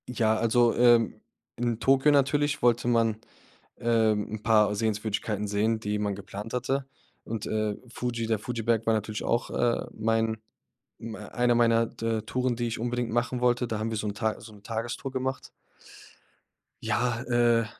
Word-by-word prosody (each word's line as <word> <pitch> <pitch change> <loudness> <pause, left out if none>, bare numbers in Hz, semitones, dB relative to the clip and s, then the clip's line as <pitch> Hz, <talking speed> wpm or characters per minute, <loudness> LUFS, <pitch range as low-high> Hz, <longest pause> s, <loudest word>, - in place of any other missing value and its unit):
Ja, 110 -3 +2
also, 115 +1 +3
ähm, 120 -2 +4 0.4
in 120 -2 -1
Tokio 135 +3 +4
natürlich 145 +1 +2
wollte 120 0 +3
man, 115 -2 +2 0.6
ähm, 110 -3 +2
'n 110 - -6
paar 105 -2 +4
Sehenswürdigkeiten 105 -1 -1
sehen, 110 +2 +1
die 105 -1 -2
man 105 -1 -1
geplant 100 +3 -8
hatte. 130 +2 -1 0.4
Und, 110 -1 -4
äh, 110 -1 -1
Fuji 120 -1 -3
der 110 -1 +1
Fuji-Berg 115 0 -1
war 115 - +3
natürlich 110 0 -3
auch, 120 - 0
äh, 120 -1 0
mein 110 0 0 0.6
hm, 115 -1 -6
einer 120 +2 0
meiner 115 -1 +4
d 115 - -9
äh, - - -5
Touren, 125 +2 -1
die 120 0 -1
ich 115 - -3
unbedingt 120 0 -2
machen 120 +2 -1
wollte. 125 0 +2
Da 110 - -2
haben 110 +1 -2
wir 110 - -3
so 105 - -3
'n 100 - -4
Ta 110 +1 -2
so 110 - -12
'n 105 -1 -16
Tagestour 115 +4 -4
gemacht. 130 0 -3 1.3
Ja, 120 -1 0
äh, 120 -1 +3
115 Hz, 170 wpm, -27 LUFS, 110-120 Hz, 1.3 s, ähm